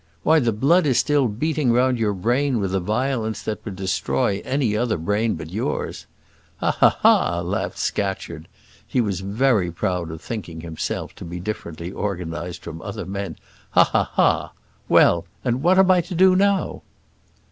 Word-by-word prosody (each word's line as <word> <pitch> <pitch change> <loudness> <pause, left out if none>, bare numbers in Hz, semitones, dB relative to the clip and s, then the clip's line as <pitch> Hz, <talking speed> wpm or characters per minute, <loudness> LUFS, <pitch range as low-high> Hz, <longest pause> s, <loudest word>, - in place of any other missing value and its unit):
why 160 +1 +5
the 120 -5 +1
blood 150 - +3
is 130 - +2
still 145 -3 +3
beating 140 +4 0
round 125 +1 +2
your 105 -3 0
brain 125 +6 +1
with 95 -2 -2
a 95 - +2
violence 110 +2 -1
that 110 - -4
would 100 -4 -6
destroy 95 -1 -1
any 130 -6 0
other 115 -1 0
brain 105 +7 0
but 80 0 -8
yours." 105 +5 -3 0.5
"Ha! - - +1
ha! - - +3
ha!" 85 0 +4
laughed 90 +4 -3
Scatcherd. 95 -5 -3 0.4
He - - 0
was 100 -6 0
very 100 -1 +1
proud 85 0 -2
of 80 0 -7
thinking 85 -5 -6
himself 80 -1 -4
to - - -9
be 85 +1 -6
differently 85 -3 -6
organised 90 -3 -4
from 80 -1 -8
other - - -6
men. 100 +1 -5 0.4
"Ha! - - +9
ha! - - 0
ha! - - +2 0.4
Well, 85 0 +4 0.2
and 125 +1 0
what 180 +4 +4
am 190 -1 +6
I 180 -1 +4
to 175 +2 -7
do 185 +1 +5
now?" 200 0 +1
105 Hz, 170 wpm, -22 LUFS, 90-130 Hz, 0.5 s, Ha